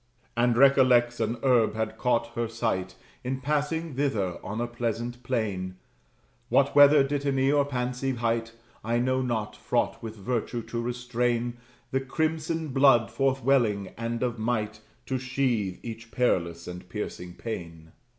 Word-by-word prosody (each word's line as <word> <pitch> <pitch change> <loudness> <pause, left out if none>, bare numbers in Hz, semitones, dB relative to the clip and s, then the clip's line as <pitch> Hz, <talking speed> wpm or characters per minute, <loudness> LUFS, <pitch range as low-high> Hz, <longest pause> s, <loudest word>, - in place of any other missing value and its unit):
And 120 0 +2
recollects 125 -3 +5
an 115 +1 0
herb 120 -5 +3
had 110 0 -2
caught 125 -2 +1
her 115 0 -1
sight 110 -5 -2 0.3
In 130 +1 -2
passing 150 +3 -1
thither, 110 -10 -1
on 100 +4 -4
a 120 - 0
pleasant 120 0 -3
plain: 105 -7 -2 0.7
What - - +3
(whether 145 0 +8
dittany 135 -1 +1
or 145 -1 +3
pancy 125 0 -2
hight) 115 -1 -1 0.3
I 115 +1 0
know 130 +2 +1
not; 115 -4 -2
fraught - - -1
with 110 -1 -6
virtue 115 +2 -2
to 115 +1 -4
restrain 120 0 -1 0.3
The 135 - +1
crimson 160 +3 -1
blood 130 -5 +4
forth 135 -1 0
welling, 115 -7 +2
and 115 +1 -3
of 120 -2 -2
might 110 -2 -1 0.3
To 130 -1 -2
sheathe 125 -7 -1
each 115 0 -7
perilous 85 -10 0
and 90 0 -8
piercing 90 -3 -6
pain. 85 -7 -7
120 Hz, 145 wpm, -27 LUFS, 110-130 Hz, 0.7 s, whether